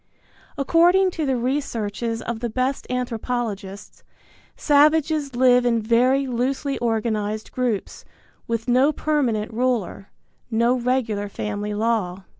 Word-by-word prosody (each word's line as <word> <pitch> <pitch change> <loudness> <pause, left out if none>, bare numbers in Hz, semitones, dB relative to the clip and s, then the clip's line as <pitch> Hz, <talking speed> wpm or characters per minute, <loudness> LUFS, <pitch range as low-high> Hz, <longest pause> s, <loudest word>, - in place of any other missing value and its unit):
According 350 +6 +4
to 315 -4 -3
the 265 - +1
researches 235 -3 -2
of 235 -1 -4
the 240 0 -3
best 255 +4 -2
anthropologists, 230 -5 -4 0.6
savages 300 -1 +2
live 250 0 +4
in 235 -2 +2
very 250 +5 +2
loosely 265 +3 -2
organized 220 -2 -2
groups, 245 -6 -3 0.4
with 230 0 -3
no 255 +4 +4
permanent 255 -9 -1
ruler, 235 -5 -1 0.4
no 235 +1 +2
regular 240 -5 -1
family 210 0 -4
law. 205 -4 -1
240 Hz, 110 wpm, -22 LUFS, 220-265 Hz, 0.6 s, According